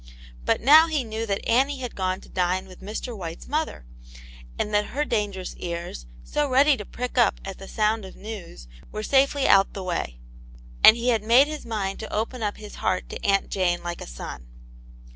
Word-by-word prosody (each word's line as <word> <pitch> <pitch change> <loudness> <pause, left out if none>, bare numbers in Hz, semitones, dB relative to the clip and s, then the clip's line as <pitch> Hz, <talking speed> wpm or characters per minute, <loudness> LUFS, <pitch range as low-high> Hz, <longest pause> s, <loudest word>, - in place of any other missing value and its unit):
But - - +2
now 310 +6 +8
he 305 -5 0
knew 225 0 -4
that 200 -1 -2
Annie 270 +4 +3
had 250 -3 -5
gone 185 -1 -1
to - - -15
dine 185 +1 0
with 185 0 -14
Mr. 220 +4 -5
White's 170 -4 -7
mother, 305 - -2 0.7
and 210 - -2
that 210 0 +3
her 295 +1 +1
dangerous 205 -7 -2
ears, 170 - -5 0.2
so 295 -1 -1
ready 275 +3 +5
to 210 -5 -7
prick 250 +3 -3
up 230 -4 +3
at 195 -1 -7
the 195 - -9
sound 215 0 0
of 190 - -10
news, 195 - -9 0.2
were 215 - -4
safely 275 +2 +3
out 195 0 +5
the 195 - -5
way. 170 - -3 0.7
And 220 - +10
he 240 +1 0
had 225 -3 +2
made 235 +5 +7
up - - -7
his 305 -5 -6
mind 200 -4 -2
to 220 - -7
open 230 +3 -2
his 210 -1 -10
heart 185 0 0
to - - -7
Aunt 195 -1 +2
Jane 175 -2 0
like 175 0 -5
a - - -7
son. - - -8
210 Hz, 200 wpm, -25 LUFS, 185-250 Hz, 0.7 s, And